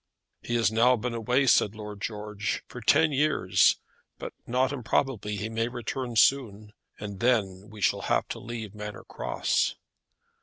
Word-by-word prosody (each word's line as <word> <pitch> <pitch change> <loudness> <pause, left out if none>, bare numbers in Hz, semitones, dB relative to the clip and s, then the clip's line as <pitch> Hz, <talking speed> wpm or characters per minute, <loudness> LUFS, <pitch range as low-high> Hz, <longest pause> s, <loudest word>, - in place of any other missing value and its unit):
"He 120 - -3
has 115 -3 +3
now 120 +3 +4
been 125 +1 -3
away," 125 +4 +1
said 110 -4 +4
Lord 105 -2 -8
George, 105 0 -3
"for 125 - -9
ten 155 +7 +4
years; 140 -9 +3 0.4
but - - -7
not 130 +2 +1
improbably 120 -4 -1
he 105 +2 -3
may 115 +1 -1
return 120 0 -4
soon, 110 -4 +2 0.3
and 100 -2 -7
then 105 -6 +1
we 110 -1 -11
shall - - +2
have - - 0
to - - -5
leave 110 -3 -7
Manor 105 -1 -7
Cross." - - -1
115 Hz, 155 wpm, -27 LUFS, 105-125 Hz, 0.4 s, now